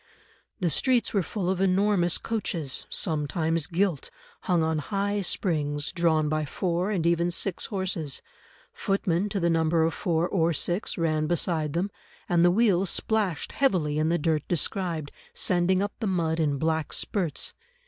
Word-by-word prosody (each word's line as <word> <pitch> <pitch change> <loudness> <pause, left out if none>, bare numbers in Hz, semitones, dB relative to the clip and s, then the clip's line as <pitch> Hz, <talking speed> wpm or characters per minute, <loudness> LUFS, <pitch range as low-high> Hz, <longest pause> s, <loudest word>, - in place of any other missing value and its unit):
The 175 -4 +1
streets 250 - +2
were 200 - +3
full 185 +1 -3
of 190 0 0
enormous 190 -2 +2
coaches, 175 - -3
sometimes 160 0 0
gilt, 175 -4 -1 0.3
hung 175 -3 +1
on 160 -1 0
high 200 +4 -1
springs, 150 -6 0
drawn 165 -4 +2
by 155 0 0
four, 175 +4 -1
and 185 -6 -1
even 170 0 +2
six 175 +1 -1
horses; 185 - -2 0.5
footmen, 195 0 0
to 195 - -2
the 170 - +1
number 165 0 +2
of 165 - +1
four 170 -1 0
or 170 -3 +1
six, 175 +6 0
ran 155 -2 0
beside 160 -3 0
them, 185 +4 -1 0.4
and 175 -2 +3
the 175 - +6
wheels 195 -2 +3
splashed 210 -7 0
heavily 165 - +1
in 155 +1 +1
the 170 - +2
dirt 155 -1 +1
described, 170 -2 -1 0.2
sending 185 +1 +2
up 205 - -3
the 220 - -1
mud 165 -4 0
in 145 -3 +1
black 160 +1 -1
spurts. 175 -8 -1
170 Hz, 160 wpm, -26 LUFS, 160-190 Hz, 0.5 s, the